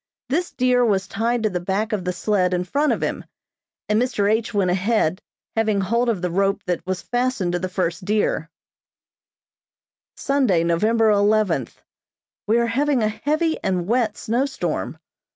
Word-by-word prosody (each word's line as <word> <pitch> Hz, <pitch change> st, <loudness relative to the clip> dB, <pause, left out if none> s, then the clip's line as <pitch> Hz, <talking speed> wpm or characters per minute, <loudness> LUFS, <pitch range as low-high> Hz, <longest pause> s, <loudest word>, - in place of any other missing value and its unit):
This 340 Hz, +6 st, 0 dB
deer 250 Hz, -1 st, +2 dB
was 195 Hz, -5 st, +1 dB
tied 230 Hz, +3 st, -1 dB
to 215 Hz, -, +2 dB
the 180 Hz, -, -1 dB
back 200 Hz, +5 st, -2 dB
of 195 Hz, -4 st, -2 dB
the 180 Hz, -, 0 dB
sled 180 Hz, 0 st, +1 dB
in 180 Hz, -, -1 dB
front 285 Hz, +11 st, +1 dB
of -, -, -1 dB
him, -, -, -2 dB, 0.6 s
and 210 Hz, +2 st, +2 dB
Mr. 230 Hz, -5 st, 0 dB
H. 220 Hz, +1 st, 0 dB
went 195 Hz, -4 st, +1 dB
ahead 185 Hz, -2 st, +1 dB, 0.3 s
having 220 Hz, -2 st, +1 dB
hold 235 Hz, +5 st, +1 dB
of 200 Hz, -6 st, -1 dB
the 180 Hz, -, -1 dB
rope 195 Hz, +2 st, +1 dB
that 175 Hz, -2 st, -2 dB
was 185 Hz, -2 st, -2 dB
fastened 245 Hz, -7 st, -1 dB
to 175 Hz, -, -1 dB
the 185 Hz, +1 st, -3 dB
first 180 Hz, -1 st, -2 dB
deer. 205 Hz, -5 st, 0 dB, 1.7 s
Sunday, 255 Hz, -12 st, +2 dB
November 215 Hz, +7 st, +2 dB
eleventh: 205 Hz, -, +1 dB, 0.6 s
We 220 Hz, +2 st, +3 dB
are 235 Hz, -, +2 dB
having 260 Hz, +1 st, +1 dB
a 215 Hz, -, +2 dB
heavy 310 Hz, +8 st, -1 dB
and 185 Hz, -3 st, 0 dB
wet 225 Hz, 0 st, 0 dB
snow 245 Hz, +5 st, 0 dB
storm. 275 Hz, -, -3 dB
210 Hz, 170 wpm, -22 LUFS, 185-235 Hz, 1.7 s, We